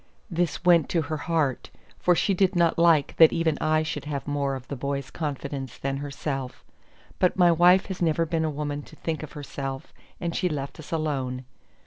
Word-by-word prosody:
This 175 0 -1
went 170 -4 +5
to 165 -2 +1
her 155 +2 -3
heart; 155 -6 0 0.3
for 180 - +3
she 195 - +2
did 190 0 +2
not 170 -1 +2
like 165 -4 +4
that 160 -1 +8
even 165 -2 +1
I 155 0 +2
should 155 - -4
have 145 -2 -4
more 140 -1 -1
of 130 -1 -9
the 140 - -4
boy's 140 0 -3
confidence 140 -4 -4
than 135 0 -2
herself; 140 -2 -5 0.5
but 180 - +2
my 175 -2 +6
wife 180 +3 +5
has 190 -2 -6
never 165 0 +2
been 165 0 -1
a 160 - 0
woman 145 -1 -3
to - - -15
think 160 -2 -3
of 155 - -8
herself, 135 -2 -6 0.3
and 170 -1 -3
she 180 - +1
left 140 -2 -5
us 155 - -11
alone. 135 -6 -2
155 Hz, 195 wpm, -26 LUFS, 140-170 Hz, 0.5 s, that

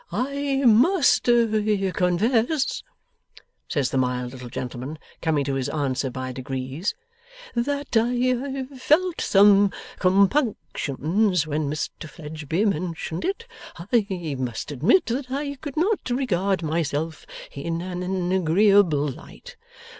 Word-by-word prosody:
'I 280 +1 -1
must 275 - +5
confess,' 220 - +1 0.9
says 135 -4 -1
the 135 - +1
mild 125 -1 -1
little 125 -2 -9
gentleman, 130 +5 -5 0.2
coming 155 -4 +1
to 140 - -1
his 135 -1 -1
answer 140 -2 -1
by 130 0 -5
degrees, 130 - -4 0.6
'that 280 +2 -2
I 250 +3 +1
felt 320 +7 +2
some 200 0 +5 0.3
compunctions 190 - +1
when 150 -1 -2
Mr 150 +1 -5
Fledgeby 160 +4 -3
mentioned 170 -3 -2
it. 395 +5 -2 0.3
I 185 - -1
must 125 +1 -4
admit 180 - +3
that 255 +2 -3
I 280 +2 -2
could 290 -1 -7
not 380 -1 +1
regard 200 -8 0
myself 155 0 -2 0.2
in 165 +4 -4
an 180 0 -2
agreeable 185 -3 +4
light. 135 - -10
185 Hz, 110 wpm, -24 LUFS, 150-245 Hz, 0.9 s, must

